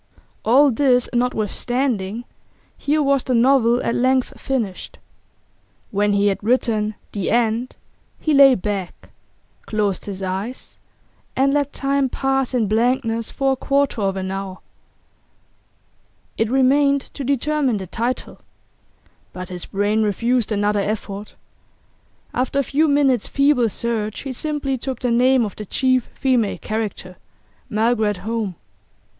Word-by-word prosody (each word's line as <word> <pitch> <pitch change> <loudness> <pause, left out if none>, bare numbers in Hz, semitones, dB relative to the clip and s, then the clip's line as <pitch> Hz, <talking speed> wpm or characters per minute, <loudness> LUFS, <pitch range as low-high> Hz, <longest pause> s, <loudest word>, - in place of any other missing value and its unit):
All 270 +5 +5
this 250 0 +3
notwithstanding, 240 -2 -1 0.5
here 300 +1 0
was 275 -2 +2
the 255 - 0
novel 245 -1 +4
at - - 0
length 255 +1 +1
finished. 230 -9 -3 0.9
When 205 0 +1
he 200 0 +2
had 200 0 0
written 220 -2 +1 0.2
'The 200 -3 -2
End' 235 +1 0 0.4
he 310 - 0
lay 275 -2 +7
back, 195 -2 -5 0.6
closed 205 -3 -1
his 195 -1 -6
eyes, 195 +7 -5 0.6
and 275 +1 +2
let 285 -1 +1
time 275 -1 0
pass 270 0 0
in 235 -3 +2
blankness 230 +1 0
for 270 -1 0
a - - -1
quarter 275 -3 0
of 195 -1 0
an 190 0 -3
hour. 195 -1 -5 1.8
It 225 - 0
remained 275 +2 +3
to 280 - -5
determine 280 -2 0
the 190 - -5
title. 235 +7 -3 0.9
But 185 -1 -7
his 180 -1 -5
brain 205 +2 0
refused 230 +3 0
another 205 0 +1
effort; 205 0 -4 1.0
after 255 +2 -1
a 280 - +3
few 295 +5 +1
minutes' 280 -5 +2
feeble 275 -4 +3
search 215 0 -2
he 270 -2 -5
simply 280 -1 -2
took 265 0 -4
the 245 0 -1
name 250 +1 +4
of 205 - -6
the 210 - -7
chief 255 +1 +1
female 250 -6 0
character, 210 -4 -4 0.5
Margaret 220 -2 +1
Home. 220 -5 -2
235 Hz, 130 wpm, -21 LUFS, 210-270 Hz, 1.8 s, lay